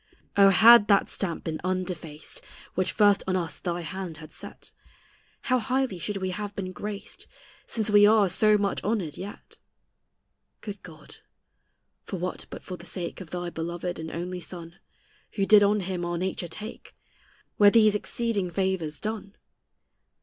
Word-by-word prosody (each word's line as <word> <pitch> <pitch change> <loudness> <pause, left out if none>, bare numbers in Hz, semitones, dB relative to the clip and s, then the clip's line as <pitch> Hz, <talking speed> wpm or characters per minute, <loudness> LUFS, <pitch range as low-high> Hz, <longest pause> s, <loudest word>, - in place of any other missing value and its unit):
O, 200 -1 +7
had 225 +2 +8
that 200 -2 +4
stamp 175 -4 -3
been 160 -1 -4
undefaced 180 -4 -3 0.3
Which 185 0 0
first 205 -1 +4
on 185 - +1
us 170 -3 -2
thy 175 -1 -3
hand 175 0 -6
had 155 -1 -12
set, - - -8 0.7
How 255 -1 +1
highly 250 -4 -1
should 205 +3 -3
we 190 -1 -2
have 205 +2 -5
been 185 -2 -4
graced, 205 +2 -7 0.4
Since 220 -2 0
we 205 0 +7
are 215 -2 +5
so 210 +4 +4
much 200 -1 -1
honored 195 -9 -1
yet! 200 +2 -9 1.0
Good 205 -2 -7
God, 155 -3 -13 0.9
for 190 - -5
what 180 +1 -4
but - - -9
for 185 - -7
the 175 - -13
sake 175 +1 -5
Of 175 - -9
thy 175 -1 -4
beloved 170 +2 -4
and 160 0 -5
only 180 +2 -4
Son, 170 0 -9 0.5
Who 195 - 0
did 210 +1 +7
on 205 +1 +3
him 180 -1 -3
our 175 0 -2
nature 185 0 -2
take, 215 +7 -8 0.6
Were 205 -1 +8
these 215 -1 +5
exceeding 210 -2 -1
favors 175 -4 -1
done? 210 -2 -5
190 Hz, 160 wpm, -27 LUFS, 175-205 Hz, 1.0 s, had